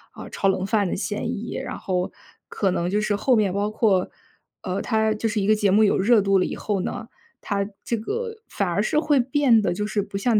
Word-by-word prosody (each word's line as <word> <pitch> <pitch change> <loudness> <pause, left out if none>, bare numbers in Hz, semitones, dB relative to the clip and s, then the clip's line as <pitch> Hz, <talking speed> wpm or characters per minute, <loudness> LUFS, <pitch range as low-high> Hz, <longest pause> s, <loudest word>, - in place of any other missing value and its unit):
呃， - - -9
炒 195 - -1
冷 190 -1 +1
饭 200 -1 +1
的 - - -2
嫌 210 +3 -3
疑。 225 +4 -6
然 - - -4
后 180 -1 -2 0.4
可 195 - 0
能 175 -1 -1
就 210 - +1
是 215 -1 0
后 245 +5 +2
面 210 -4 +2
包 205 +2 0
括， 200 -4 +2 0.5
呃， 185 +2 -3
它 220 -1 +1
就 220 +1 -1
是 210 -1 -1
一 195 - -1
个 215 - +5
节 205 -2 +2
目 215 +2 +5
有 205 - +3
热 215 +2 +4
度 195 0 +3
了 185 - +2
以 - - -4
后 200 -3 -2
呢， 225 - -5 0.3
它 200 -1 -2 0.2
这 235 - -1
个 450 - -4
反 200 - -1
而 195 +4 0
是 300 - +1
会 295 -3 +2
变 255 -2 +3
得 175 -3 0
就 210 +3 -2
是 210 - 0
不 200 0 -6
像 225 0 +3
210 Hz, 260 characters per minute, -23 LUFS, 195-225 Hz, 0.5 s, 个